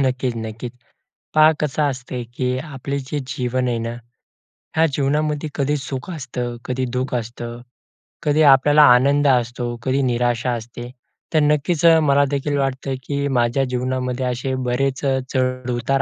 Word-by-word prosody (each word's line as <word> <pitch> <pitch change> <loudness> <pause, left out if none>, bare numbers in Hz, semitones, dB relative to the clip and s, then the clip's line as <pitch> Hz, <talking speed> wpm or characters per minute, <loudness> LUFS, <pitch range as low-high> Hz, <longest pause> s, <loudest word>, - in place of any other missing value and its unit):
नक्कीच, 130 -1 -1
नक्कीच. 115 +2 -6 0.6
पहा 155 +1 +7
कसं 150 0 0
असतं, 125 -1 -5
की 125 -1 0
आपले 140 -1 -4
जे 135 +2 -4
जीवन 125 0 -1
आहे 120 -1 0
ना, 115 0 -3 0.9
ह्या 160 +1 +4
जीवनामध्ये 150 +2 0
कधी 145 +1 0
सुख 135 +1 -6
असतं, 125 -6 -4
कधी 130 0 -1
दुःख 130 +1 -2
असतं, 120 0 -5 0.6
कधी 150 0 +2
आपल्याला 145 +3 +5
आनंद 140 +3 +3
असतो, 120 -1 +1
कधी 135 +1 +1
निराशा 120 +1 0
असते. 120 +1 -7 0.4
तर 155 - +4
नक्कीच 150 +3 +1 0.2
मलादेखील 140 +1 +2
वाटतं, 135 0 -1
की 140 0 -2
माझ्या 120 +3 +2
जीवनामध्ये 125 0 -1
असे 125 +1 -2 0.2
बरेच 135 +2 0
चढ-उतार 130 0 0
130 Hz, 135 wpm, -21 LUFS, 125-140 Hz, 0.9 s, पहा